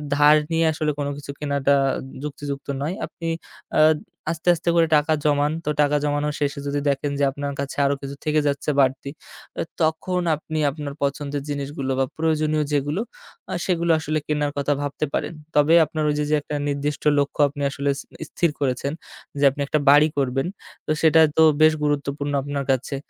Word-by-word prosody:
ধার 150 +1 +6 0.2
নিয়ে 165 0 +2
আসলে 155 -1 -1
কোন 140 - -1
কিছু 145 -1 -7
কেনাটা 140 -1 +1 0.5
যুক্তিযুক্ত 140 -1 -5
নয়। 155 +6 -2
আপনি 165 - -8 0.5
আ - - +7 0.5
আস্তে, 165 +1 -7
আস্তে 170 - -2
করে 165 -1 +4
টাকা 150 +2 +1
জমান। 145 0 +2
তো - - -1
টাকা 145 0 +2
জমানো 145 0 0
শেষে 145 0 -1
যদি 145 0 -1
দেখেন 140 +1 -1
যে 145 - +2
আপনার 140 +1 -4
কাছে 140 0 -4
আরও 140 - +2
কিছু 140 0 -6
থেকে 155 -1 +2
যাচ্ছে 140 +1 -1
বাড়তি, 135 0 +1 0.7
তখন 165 +3 0
আপনি 155 +1 -5
আপনার 145 -1 -6
পছন্দের 140 0 -2
জিনিসগুলো 140 -1 -3
বা 135 - +3
প্রয়োজনীয় 155 -1 +1
যেগুলো 145 +6 0 0.5
আ - - -2
সেগুলো 170 -2 +1
আসলে 155 0 -1
কেনার 150 -1 0
কথা 145 +1 +1
ভাবতে 145 +1 -2
পারেন। - - -2 0.2
তবে 150 +2 +5
আপনার 155 +1 -3
ওইযে, 150 0 0
যে 150 - +3
একটা 150 - -5
নির্দিষ্ট 145 +1 -2 0.2
লক্ষ্য 140 +1 0
আপনি 145 +1 -8
আসলে 140 +1 -2
ইস 135 - -7 0.3
স্থির 170 - +1
করেছেন 135 0 -1 0.5
যে - - 0
আপনি 145 +1 -6
একটা 155 - +1
বাড়ি 145 +2 +7
করবেন, 135 +2 0 0.4
তো - - -2
সেটা 160 0 +6 0.2
তো 160 - +7 0.2
বেশ 155 0 +7
গুরুত্বপূর্ণ 145 0 -1
আপনার 140 0 -3
কাছে। 130 +2 -1
145 Hz, 175 wpm, -23 LUFS, 140-155 Hz, 0.7 s, আ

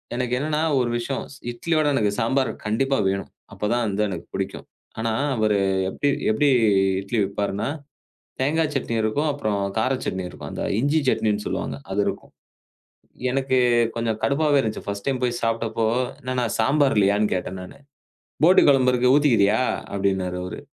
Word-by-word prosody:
எனக்கு 125 0 -2
என்னன்னா 150 +2 -1 0.2
ஒரு 125 -2 0
விஷயம். 130 +3 -3 0.3
இட்லியோட 155 +5 0
எனக்குச் 105 -3 0
சாம்பார் 130 +3 +1
கண்டிப்பா 135 +6 +1
வேணும். 100 0 -3 0.2
அப்பதான் 120 +3 -1
அது 105 +1 0
எனக்குப் 90 -4 -7
பிடிக்கும். - - -4 0.3
ஆனா 115 0 -1 0.2
அவரு 110 -2 +2 0.3
எப்படி 145 +8 -1 0.2
எப்படி 140 +7 +2 0.5
இட்லி 100 +4 -3
விற்பார்னா, 100 +1 -2 0.7
தேங்காய் 150 +3 +1
சட்னி 125 -4 -2
இருக்கும். 145 +8 0
அப்புறம் 110 -8 -2 0.2
கார 120 +4 +1
சட்னி 95 0 -2
இருக்கும். - - -9
அந்த - - -4 0.2
இஞ்சி 145 +5 +2
சட்னி 110 - +2 0.2
சொல்லுவாங்க. - - -3 0.2
அது 100 - 0
இருக்கும். - - -5 1.0
எனக்குக் 125 -3 +2
கொஞ்சம் 115 -2 -1
கடுப்பாவே 145 0 +2
இருந்துச்சு. 110 -3 -4
ஃபர்ஸ்ட் 100 0 -5
டைம் 130 -2 -1
போய்ச் 120 -1 -1
சாப்பிட்டப்போ 115 0 0 0.3
என்னன்னா, 125 -1 -1
சாம்பார் 135 +4 +3
இல்லையான்னு 105 +1 +2
கேட்டேன் 90 +1 -4
நானு. 90 - -12 0.7
"போட்டி 180 +3 +7
குழம்பு 130 -3 +5
இருக்கு 125 0 +3
ஊத்திக்கிறயா" 115 -7 +3 0.3
அப்படின்னாரு 95 -2 -1
அவரு. 90 - -6
120 Hz, 150 wpm, -23 LUFS, 105-135 Hz, 1.0 s, போட்டி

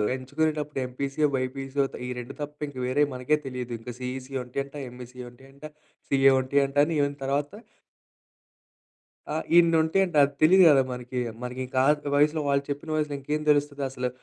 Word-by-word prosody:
ఎంచుకునేటప్పుడు 150 +2 -2
ఎంపీసీయో, 140 +4 -1
బీపీసీయో 135 +2 -1
త్ - - -6
ఈ - - -5
2 125 +3 -8
తప్ప 145 0 -6
ఇంకా 135 -3 -8
వేరేవి 145 +3 +2
మనకే 125 +4 +1
తెలియదు. 125 -2 -5
ఇంకా 120 +2 -8
సీఈసీ 130 +1 -6
ఉంటయంట, 140 +3 -5
ఎంఈసీ 125 0 -11
ఉంటయంట 135 +4 -19 0.5
సీఏ 135 0 +5
ఉంటయంట 140 +1 0
అని 165 - -2
ఈవెన్ 140 0 0
తర్వాత 140 +3 -1 1.8
ఆహ్, 160 - -2
ఇన్నుంటాయంట. 170 +1 +3
అది 140 +1 0
తెలీదు 185 +4 +7
గదా! 135 -2 +6
మనకి. 125 0 -5 0.2
మనకింకా 130 +1 -3
ఆ - - +7
త - - -6
వయసులో 150 +2 +3
వాళ్ళు 140 0 +2
చెప్పిన 145 +3 -5
వయసులో 150 -1 -1
ఇంకేం 150 +3 -2
తెలుస్తది 145 -1 +2
అసలు 125 -1 -3
140 Hz, 155 wpm, -26 LUFS, 130-150 Hz, 1.8 s, తెలీదు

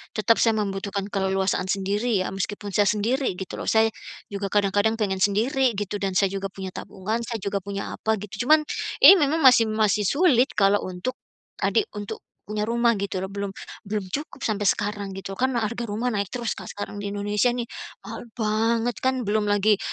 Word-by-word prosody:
tetap 225 +1 +3
saya 225 -1 +3
membutuhkan 200 -1 -3
keleluasaan 190 -2 0
sendiri 200 +3 0
ya, 185 - -1
meskipun 205 +1 -4
saya 205 -1 +4
sendiri 240 +6 0
gitu 190 - -6
loh - - -6
saya, 220 0 +4 0.4
juga 200 -1 -4
kadang-kadang 205 +2 +2
pengen 190 -3 0
sendiri 240 +6 +2
gitu 205 0 -3
dan 195 -1 0
saya 195 - +4
juga 195 0 -3
punya 190 -1 -6
tabungan, 215 +4 -4
saya 230 0 -4
juga 200 0 -2
punya 200 0 -5
apa 220 -1 -1
gitu, 210 +4 -5
cuman 310 +1 +6 0.4
ini 390 - +12
memang 300 +2 +2
masih 250 -5 +6
masih 215 -1 +2
sulit 280 - +3
kalau 200 0 +3
untuk 185 +7 -4 0.5
adik 430 - +2
untuk 205 -1 -5 0.2
punya 210 0 -3
rumah 235 0 +3
gitu 195 -2 -3
loh, 190 - -5
belum 200 0 -4 0.4
belum 205 -1 -2
cukup 290 +7 -5
sampai 205 -2 0
sekarang 205 -1 -1
gitu 195 0 -6
kan 255 +6 0
harga 235 +1 -2
rumah 225 +4 -1
naik 200 -2 -1
terus 235 +2 -3
Kak, - - -9
sekarang 205 0 -6
di 205 - -4
Indonesia 205 +2 0
nih 245 - -2 0.4
mahal - - -8
banget 225 +2 +1
kan 260 -1 0
belum 210 0 0
lagi 205 0 +3
210 Hz, 185 wpm, -24 LUFS, 200-230 Hz, 0.5 s, ini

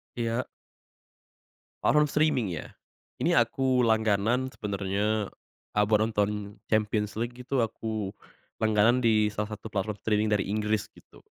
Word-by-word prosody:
Iya. 120 +1 -1 1.4
Platform 150 0 +4
streaming 150 -6 +2
ya. 85 -4 -5 0.5
Ini - - +2
aku 125 +2 +2
langganan 110 +2 +2
sebenernya, 105 -1 -1 0.5
a 105 - +4
buat 105 0 +3
nonton 105 -1 -1 0.2
Champions 105 0 0
League 120 +1 -3
gitu 130 +1 -1
aku 110 -3 -2 0.5
langganan 110 +3 +4
di 110 -2 +4
salah 105 +1 -3
satu 105 +1 -7
platform 105 0 -3
streaming 105 0 +1
dari 105 -2 +1
Inggris 105 0 0
gitu, - - -18
110 Hz, 125 wpm, -28 LUFS, 105-115 Hz, 1.4 s, Platform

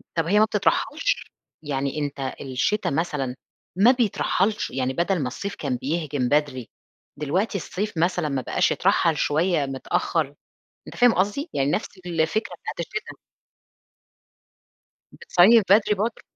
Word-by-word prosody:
طب 165 -1 +1
هي 205 +3 +4
ما 215 - +6
بتترحلش؟ 290 - 0 0.3
يعني 140 +1 -2
أنت 140 -2 -3
الشتا 135 +10 -1
مثلًا 140 -4 -2 0.4
ما 215 +7 +6
بيترحلش 215 -3 0
يعني 130 0 -1
بدل 170 +3 0
ما 130 - -1
الصيف 200 +11 -5
كان 135 -4 -2
بيهجم 145 -2 -2
بدري 145 -5 0 0.5
دلوقتي 185 +8 -1
الصيف 195 +1 -4
مثلًا 175 -2 +1
ما 135 -2 -1
بقاش - - +1
يترحّل 160 -3 +2
شوية 155 0 +1
متأخر 140 +2 -1 0.5
أنت - - -9
فاهم 245 -1 +5
قصدي 205 - -1
يعني 140 +1 +1
نفس - - -1 0.2
الفكرة 175 +5 -1
بتاعة - - -6
الشتا؟ 215 +6 -5 1.9
بتصيّف 205 +5 +5
بدري 210 +1 +5
برضه؟ 220 +3 -2
165 Hz, 130 wpm, -24 LUFS, 140-205 Hz, 1.9 s, ما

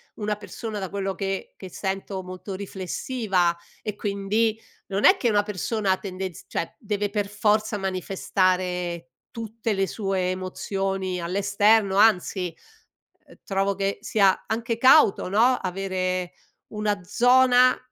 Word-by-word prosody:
una 210 -1 -2
persona, 210 +1 -6
da 190 -2 -4
quello 195 0 -2
che 195 -1 -4
che 190 - -9
sento, 190 +1 -4
molto 185 +1 -7
riflessiva 190 -1 -1 0.3
e 210 -2 -4
quindi 210 +2 0 0.3
non 195 +1 0
è 380 - +8
che 245 - +1
una 205 -1 +3
persona 205 0 -1
tendenz 185 -3 -6
cioè, 165 - -4
deve 205 -4 -2
per 205 -1 -1
forza 210 +1 +1
manifestare 185 -2 -1 0.2
tutte 225 -1 -4
le 195 -1 +1
sue 190 -3 -1
emozioni 185 0 -3
all'esterno. 200 +3 +2
Anzi, 185 -4 +3 0.7
ehm, - - -16
trovo 195 0 0
che 195 +1 -2
sia 200 -3 +2
anche 230 +1 -2
cauto, 255 -7 +5
no, 235 +6 +4
avere 185 -1 -2 0.4
una 210 -1 -1
zona 250 +5 +5
195 Hz, 125 wpm, -25 LUFS, 185-215 Hz, 0.7 s, è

